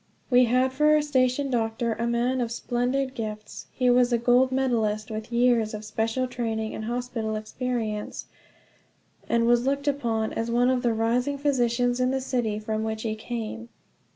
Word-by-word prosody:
We 250 0 +6
had 255 +2 +2
for 300 +3 +2
our 305 - +3
station 265 -1 +1
doctor 230 0 0
a 230 +2 -2
man 245 +2 0
of 235 -1 -2
splendid 250 +3 -1
gifts. 215 -3 -6
He 250 - 0
was 245 0 +4
a 240 - +3
gold 245 +2 +3
medalist, 225 -5 0
with 220 +2 -6
years 235 -3 +2
of 215 0 -7
special 225 +4 -1
training 225 -3 -3
and 220 - -5
hospital 240 -2 -3
experience, 215 -1 -3 1.0
and 230 0 +2
was 240 +1 +3
looked 280 +1 -1
upon 230 -6 0
as 230 +1 -2
one 245 +2 +3
of 255 -1 +1
the 235 -2 +1
rising 245 +5 0
physicians 245 -3 +1
in 255 0 +2
the 265 0 0
city 240 -5 -1
from 215 0 -3
which 220 0 -3
he 220 -2 -1
came. 230 +1 -6
240 Hz, 175 wpm, -26 LUFS, 220-255 Hz, 1.0 s, We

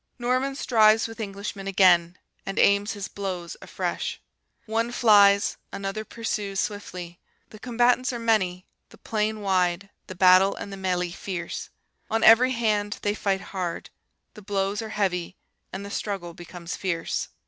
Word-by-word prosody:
Norman 255 +2 0
strives 220 -4 +4
with 225 +1 -11
Englishman 200 -1 -5
again, 180 -2 +4 0.3
and 195 - -6
aims 200 +2 +3
his 205 -2 -5
blows 185 -4 -5
afresh. - - -4 0.5
One 230 +2 -1
flies, 205 -4 +5
another 195 +2 -4
pursues 210 -3 -4
swiftly: 180 -5 -5 0.3
the 215 - -12
combatants 245 +2 +2
are 240 - -4
many, 190 -6 0 0.2
the - - -17
plain 215 -1 -2
wide, 185 0 0 0.2
the 185 - -8
battle 185 +1 +5
and 200 - -7
the - - -5
MELEE 180 -2 -1
fierce. 180 -1 -5 0.4
On 225 - 0
every 250 +4 +7
hand 210 -3 0
they 205 - +1
fight 195 -2 -1
hard, 180 -3 -4 0.4
the 210 - -12
blows 200 +1 -1
are 220 - -6
heavy, 185 -4 -2 0.3
and 195 +1 -6
the 200 - -8
struggle 195 -6 -4
becomes 175 0 -8
fierce. 170 -4 -2
200 Hz, 150 wpm, -25 LUFS, 185-220 Hz, 0.5 s, every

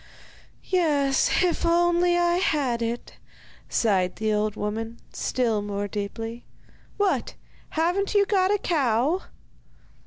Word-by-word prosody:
'Yes, 295 -5 +2
if 355 -2 0
only 345 +1 +3
I 345 0 +2
had 275 -9 0
it!' 230 +1 -4 0.5
sighed 190 -5 +1
the 215 0 -1
old 210 0 0
woman, 225 +3 -4 0.2
still 230 -5 0
more 205 0 -3
deeply. 225 +3 -5 0.5
'What! 405 -2 0 0.3
haven't 355 +6 0
you 405 -1 +5
got 380 -2 +2
a 415 - +3
cow? 290 - +1
275 Hz, 115 wpm, -25 LUFS, 220-350 Hz, 0.5 s, you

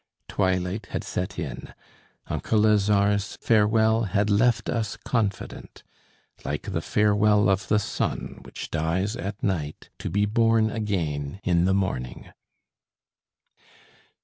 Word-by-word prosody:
Twilight 95 +1 -1
had - - -4
set 90 +2 -4
in, - - -6 0.5
uncle 110 -1 0
Lazare's 105 -1 +2
farewell 110 +1 +3
had 100 +2 +1
left 115 +3 +3
us 115 -3 -2
confident, 105 -6 -3 0.6
like - - -3
the - - -1
farewell 105 -1 +3
of 95 -1 +1
the 105 - +3
sun 105 - -3
which - - -8
dies 85 +7 0
at 100 +1 -6
night 80 -6 -3
to - - -4
be 100 +4 +1
born 115 0 +3
again 85 -8 -2
in 85 -1 +2
the 95 +1 +3
morning. 95 -11 -3
100 Hz, 120 wpm, -25 LUFS, 95-105 Hz, 0.6 s, farewell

